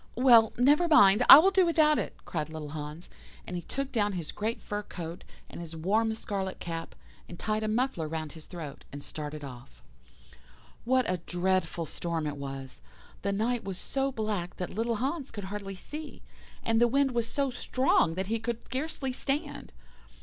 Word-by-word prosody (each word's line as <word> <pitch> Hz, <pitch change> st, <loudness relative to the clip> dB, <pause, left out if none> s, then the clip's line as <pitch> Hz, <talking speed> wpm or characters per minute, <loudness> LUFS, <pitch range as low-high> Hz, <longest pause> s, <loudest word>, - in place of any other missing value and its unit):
"'Well, 235 Hz, -3 st, +6 dB
never 290 Hz, +8 st, +4 dB
mind, 220 Hz, -8 st, +6 dB
I -, -, +15 dB
will 370 Hz, +6 st, +6 dB
do 380 Hz, -1 st, +4 dB
without 310 Hz, -3 st, +4 dB
it,' -, -, -4 dB
cried 155 Hz, -3 st, -3 dB
little 155 Hz, -2 st, -6 dB
Hans, 150 Hz, +2 st, -7 dB, 0.4 s
and 180 Hz, -, -6 dB
he 175 Hz, -, -3 dB
took 275 Hz, +8 st, -4 dB
down 210 Hz, -4 st, +1 dB
his 170 Hz, -4 st, -4 dB
great 220 Hz, +2 st, -2 dB
fur 205 Hz, -1 st, -4 dB
coat, 170 Hz, -4 st, -7 dB, 0.2 s
and -, -, -9 dB
his 165 Hz, -1 st, -8 dB
warm 210 Hz, +7 st, +1 dB
scarlet 195 Hz, -3 st, -4 dB
cap, 165 Hz, -1 st, -5 dB, 0.3 s
and 175 Hz, -, -8 dB
tied 215 Hz, +2 st, -1 dB
a 215 Hz, -, -1 dB
muffler 220 Hz, -7 st, 0 dB
round 155 Hz, -1 st, -4 dB
his 160 Hz, 0 st, -12 dB
throat, 165 Hz, -6 st, -8 dB
and 145 Hz, 0 st, -8 dB
started 150 Hz, -1 st, -6 dB
off. 120 Hz, -, -11 dB, 1.0 s
"What 255 Hz, +1 st, +3 dB
a 185 Hz, -, 0 dB
dreadful 175 Hz, -1 st, -1 dB
storm 165 Hz, +1 st, -3 dB
it 145 Hz, -1 st, -3 dB
was! 135 Hz, -2 st, -7 dB, 0.4 s
The 200 Hz, -, -1 dB
night 225 Hz, +4 st, 0 dB
was 190 Hz, -2 st, -5 dB
so 270 Hz, +5 st, -1 dB
black 215 Hz, -7 st, -3 dB
that 180 Hz, -, -5 dB
little 230 Hz, +2 st, 0 dB
Hans 275 Hz, +5 st, -2 dB
could 205 Hz, -, -7 dB
hardly 195 Hz, 0 st, -5 dB
see, 300 Hz, +11 st, -8 dB, 0.4 s
and 225 Hz, 0 st, +2 dB
the 240 Hz, -, +6 dB
wind 275 Hz, +2 st, +2 dB
was 235 Hz, -2 st, 0 dB
so 275 Hz, +3 st, -1 dB
strong 250 Hz, -10 st, +2 dB
that 190 Hz, +1 st, -2 dB
he 225 Hz, +3 st, -1 dB
could 235 Hz, 0 st, -4 dB
scarcely 270 Hz, -1 st, -3 dB
stand. 275 Hz, +3 st, -3 dB
205 Hz, 185 wpm, -29 LUFS, 165-250 Hz, 1.0 s, I